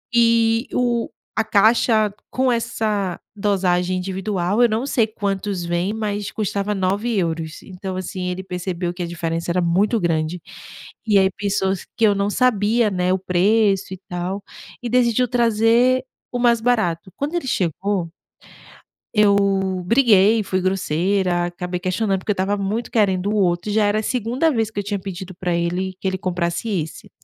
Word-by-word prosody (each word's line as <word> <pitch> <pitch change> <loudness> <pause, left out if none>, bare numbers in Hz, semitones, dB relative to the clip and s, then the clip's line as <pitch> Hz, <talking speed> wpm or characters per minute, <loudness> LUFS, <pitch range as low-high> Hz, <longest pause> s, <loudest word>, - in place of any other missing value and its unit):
Eh, 230 0 +4
o 240 -2 0 0.3
a 220 - +3
caixa 215 0 +3 0.2
com 260 0 +1
essa 220 -5 -1 0.2
dosagem 185 -3 +1
individual, 190 +2 -1
eu - - +6
não 225 +4 -1
sei 230 -5 +2
quantos 200 -3 -3
vêm, 175 +4 -1
mas 205 -2 -3
custava 205 -1 -2
9 200 +4 0
euros. 165 -3 -2
Então, 190 0 -7
assim, 185 0 -4
ele 180 +1 -4
percebeu 180 -1 -3
que 180 - -7
a - - -3
diferença 165 0 -3
era 180 +1 +1
muito 190 +7 +2
grande, 165 -1 -1 0.7
e 210 -2 +4
aí 190 0 +4
pensou 195 -1 0
s 190 - -7
que 230 - +4
eu 205 - +5
não 200 +1 0
sabia, 225 -1 +2
né, 180 -1 +1
o - - +2
preço 195 +1 +2
e 185 - -8
tal, 180 +3 -4 0.4
e 240 - -2
decidiu 245 0 +3
trazer 235 +2 +3 0.3
o 245 - -2
mais 235 -1 +4
barato. 190 -8 0
Quando 290 +3 -3
ele 340 -6 -2
chegou 185 - -1 1.0
eu 210 -2 +5 0.5
briguei, 220 -1 +4
fui 190 -1 -1
grosseira, 185 0 0
acabei 180 0 -4
questionando 190 +2 0
porque 210 - -1
eu - - -4
estava 195 +2 0
muito 210 +4 -3
querendo 200 -3 +1
o 215 - 0
outro, 180 0 +1
e - - -1
já 215 -1 +3
era 205 +1 +2
a - - -5
segunda 250 +7 0
vez 225 -6 0
que 205 - -3
eu 200 - -6
tinha 205 0 -2
pedido 185 -1 -7
pra 175 0 -2
ele, 180 +2 -1
que - - -5
ele 190 0 -2
comprasse 175 +2 -2
esse. 165 -7 -4
200 Hz, 170 wpm, -21 LUFS, 180-220 Hz, 1.0 s, eu